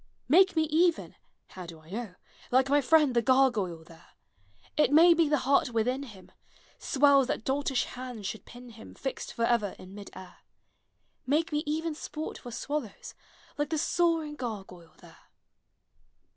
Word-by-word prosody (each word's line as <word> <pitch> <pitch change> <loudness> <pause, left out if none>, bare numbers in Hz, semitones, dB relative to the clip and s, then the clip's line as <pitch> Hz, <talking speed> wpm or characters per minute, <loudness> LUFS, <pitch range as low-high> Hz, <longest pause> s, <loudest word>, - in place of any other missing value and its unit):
Make 375 +6 +5
me 320 - +3
even 335 +1 +2 0.4
(How 180 -2 -9
do 165 -1 -11
I 155 +2 -18
know?) 215 -3 -6 0.3
Like 260 +2 +3
my 290 +1 +4
friend 295 -1 +3
the 235 - +4
gargoyle 230 -10 +2
there; 165 0 -17 0.7
It 300 - +3
may 335 +3 +7
be 330 -2 +2
the 300 - +3
heart 275 -1 +3
within 245 +3 -1
him 210 -9 -12 0.5
Swells 280 -1 +3
that 260 -5 -3
doltish 270 0 0
hands 245 -4 -8
should 215 +2 -5
pin 245 +1 -12
him 225 -1 -13
Fixed 270 - -5
forever 230 -3 0
in 185 +1 -13
mid 205 0 -10
air. 185 -1 -12 0.9
Make 310 +5 +1
me 300 0 0
even 320 +2 -2
sport 305 +1 -7
for 245 - -10
swallows, 265 -2 -5 0.5
Like 295 -1 -1
the 320 - -1
soaring 325 -1 0
gargoyle 195 - -8
there! - - -17
260 Hz, 160 wpm, -28 LUFS, 215-300 Hz, 0.9 s, may